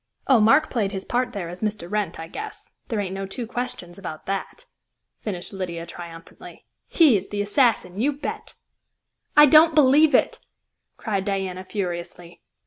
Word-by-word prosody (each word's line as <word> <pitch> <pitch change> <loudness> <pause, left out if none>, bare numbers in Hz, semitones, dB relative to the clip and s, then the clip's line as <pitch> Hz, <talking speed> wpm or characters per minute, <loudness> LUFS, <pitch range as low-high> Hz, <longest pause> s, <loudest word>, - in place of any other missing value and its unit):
Oh, 260 -4 +5
Mark 275 +9 +4
played 210 -6 0
his 190 -1 -5
part 245 0 -1
there 200 -7 -5
as 175 +2 -9
Mr. 210 -5 -3
Wrent, 200 -4 -2
I 160 - -6
guess; 420 - -9 0.2
there 225 -4 -2
ain't 190 -2 -3
no 195 0 -4
two 235 +5 -5
questions 240 -7 -5
about 160 -5 -8
that," 195 0 -5 0.5
finished 190 -3 -6
Lydia 170 -3 -5
triumphantly. 170 -1 -11 0.2
"He 310 -9 +5
is 195 - -7
the 205 - -4
assassin, 205 -4 +1
you 285 +4 +2
bet!" 290 +1 -7 0.8
"I 295 - +10
don't 310 +2 +6
believe 300 +1 +5
it!" - - +2 0.6
cried 200 -3 -2
Diana 190 -2 -3
furiously. 175 -3 -6
200 Hz, 160 wpm, -23 LUFS, 180-250 Hz, 0.8 s, I